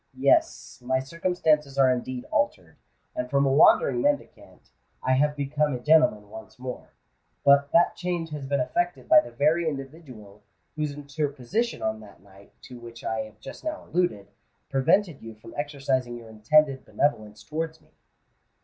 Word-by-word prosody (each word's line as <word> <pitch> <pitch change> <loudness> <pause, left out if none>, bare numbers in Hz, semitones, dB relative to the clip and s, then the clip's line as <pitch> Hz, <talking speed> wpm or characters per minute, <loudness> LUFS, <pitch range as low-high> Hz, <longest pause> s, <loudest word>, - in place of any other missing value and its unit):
Yes—my 130 +1 +1
circumstances 150 -1 0
are 135 -2 +5
indeed 125 0 -4
altered; 90 -8 -1 0.4
and 125 0 -3
from 140 +1 +2
a 135 - +2
wandering 135 -3 +5
mendicant, 145 +3 -3 0.3
I 130 - +1
have 145 +3 +2
become 145 0 -1
a - - -5
gentleman 150 -8 +3
once 110 0 -11
more. 125 0 -8 0.5
But 140 0 +5
that 170 - +4
change 175 -2 -3
has 145 -3 -6
been 140 0 0
effected 175 +3 -2
by 155 - +8
the 120 - -4
very 155 +7 +1
individual 135 -8 -10 0.3
whose 150 -1 -2
interposition 145 - -3
on 110 0 -1
that 105 -2 -15
night 100 0 -19
to 125 -1 -11
which 120 -1 -12
I 110 - -2
have 110 0 -16
just - - -10
now 310 0 -5
alluded, 175 - -1 0.4
prevented 155 +4 +2
you 115 -1 -10
from 115 +1 -14
exercising 135 -4 -2
your 115 -1 -12
intended 135 +5 +2
benevolence 110 -8 -2
towards 160 +1 -4
me." - - -28
135 Hz, 155 wpm, -26 LUFS, 120-155 Hz, 0.5 s, by